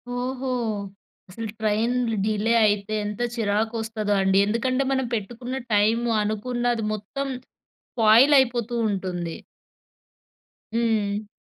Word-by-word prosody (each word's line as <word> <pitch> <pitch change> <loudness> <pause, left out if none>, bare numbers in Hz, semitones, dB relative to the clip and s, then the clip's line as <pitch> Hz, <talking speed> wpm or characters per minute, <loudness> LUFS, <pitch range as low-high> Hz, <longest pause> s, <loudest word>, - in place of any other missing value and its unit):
ఓహో! 260 +1 -3 0.8
అసలు 225 +4 -6
ట్రైన్‌లు 225 +2 0
డిలే 215 +2 +1
అయితే 205 0 0
ఎంత 210 +3 -4
చిరాకొస్తదో 220 0 -1
అండి. 190 0 +3
ఎందుకంటే 255 +5 0
మనం 265 -1 +1
పెట్టుకున్న 240 +5 -5 0.2
టైము, 225 +3 +2
అనుకున్నది 240 +2 -1
మొత్తం 245 +7 -4 0.7
స్పాయిలైపోతూ 240 +1 +4
ఉంటుంది. 180 -4 -3 1.4
హ్మ్. 215 -3 0
225 Hz, 90 wpm, -24 LUFS, 210-245 Hz, 1.4 s, స్పాయిలైపోతూ